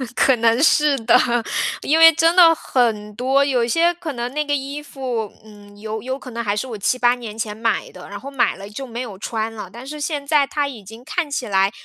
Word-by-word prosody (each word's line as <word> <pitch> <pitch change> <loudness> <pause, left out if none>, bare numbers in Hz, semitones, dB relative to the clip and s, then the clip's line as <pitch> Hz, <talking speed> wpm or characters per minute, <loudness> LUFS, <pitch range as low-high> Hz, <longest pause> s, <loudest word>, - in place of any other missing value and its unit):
可 265 - +4
能 230 +3 +2
是 300 -2 +4
的， 225 +1 +3 0.7
因 315 +2 +2
为 325 0 +9
真 325 +2 +3
的 335 -3 +7
很 220 -7 -1
多， 265 +4 +2
有 250 -4 +1
些 335 +7 +2
可 330 -3 -6
能 240 0 -4
那 300 +1 0
个 290 0 0
衣 280 +2 -5
服， 255 -7 -4
嗯， 205 -1 -16
有 220 0 -5
有 260 +3 -4
可 255 -2 -11
能 235 +1 -4
还 205 -1 -1
是 210 - -2
我 225 - -6
7，8 240 +5 +2
年 225 -3 -9
前 215 -2 -4
买 225 0 -1
的。 180 -1 -12
然 200 0 -7
后 275 +6 -8
买 270 - +1
了 200 +1 -10
就 265 +6 -7
没 235 +1 -5
有 215 -7 -7
穿 225 +1 -3
了， 210 -4 -8
但 240 +5 -10
是 300 +2 -7
现 295 -1 -3
在 290 -1 +3
它 290 0 -1
已 235 -7 -9
经 225 +5 -12
看 320 +3 -2
起 260 -4 -3
来 195 -1 +2
245 Hz, 250 characters per minute, -20 LUFS, 220-285 Hz, 0.7 s, 为